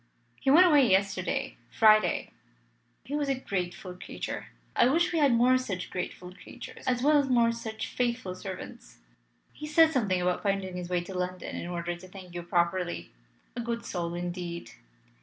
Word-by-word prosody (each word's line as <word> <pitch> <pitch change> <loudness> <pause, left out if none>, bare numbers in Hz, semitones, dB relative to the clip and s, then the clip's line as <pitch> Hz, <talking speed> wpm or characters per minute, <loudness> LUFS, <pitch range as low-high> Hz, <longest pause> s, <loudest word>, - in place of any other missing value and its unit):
"He - - 0
went 335 +7 +8
away 290 -8 +5
yesterday 190 -1 0
Friday. 215 -1 +4 0.7
He 275 +6 -4
was 290 -1 0
a 270 - +2
grateful 185 -6 -4
creature. 180 - -6 0.3
I - - +5
wish 335 +6 +2
we 330 - +2
had 285 -3 +5
more 250 +2 +4
such 190 -8 -4
grateful 180 0 -5
creatures - - -11
as 250 -1 +1
well 295 +1 +5
as 275 -1 0
more 235 -2 +4
such 220 -1 -5
faithful 240 -6 -2
servants. 185 - -9 0.6
He 300 - -7
said 320 +1 +5
something 205 -9 +1
about 180 0 0
finding 195 -2 -1
his 180 -1 -5
way 180 -1 +1
to 190 - -8
London 180 0 -4
in - - -5
order 175 0 -3
to 180 +2 -12
thank 185 -1 -12
you 175 - -4
properly. 170 - -1 0.4
A 240 - -2
good 235 0 -3
soul, 170 -4 -3
indeed!" 175 -6 -5
195 Hz, 175 wpm, -29 LUFS, 180-250 Hz, 0.7 s, went